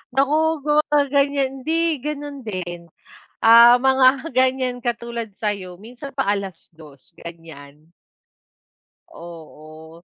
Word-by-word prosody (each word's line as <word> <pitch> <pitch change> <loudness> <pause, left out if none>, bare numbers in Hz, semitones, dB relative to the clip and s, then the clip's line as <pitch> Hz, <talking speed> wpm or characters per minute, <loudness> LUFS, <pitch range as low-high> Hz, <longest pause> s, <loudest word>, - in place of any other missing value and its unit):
Naku, 305 +2 +1
gumaganiyan, 285 -2 +1 0.2
hindi 325 -2 0
gano'n 290 0 -6
din, 175 -6 -7 0.5
ah 235 +2 +7
mga 265 +3 +3
ganiyan 255 -1 0
katulad 235 -2 -4
sa 210 +2 -4
iyo, 180 -1 -11
minsan 250 +5 -11
pa 270 -6 -2
2:00 165 -7 -6
ganiyan. 160 -3 -13 1.2
Oo. 160 0 -13
235 Hz, 95 wpm, -21 LUFS, 170-280 Hz, 1.2 s, ah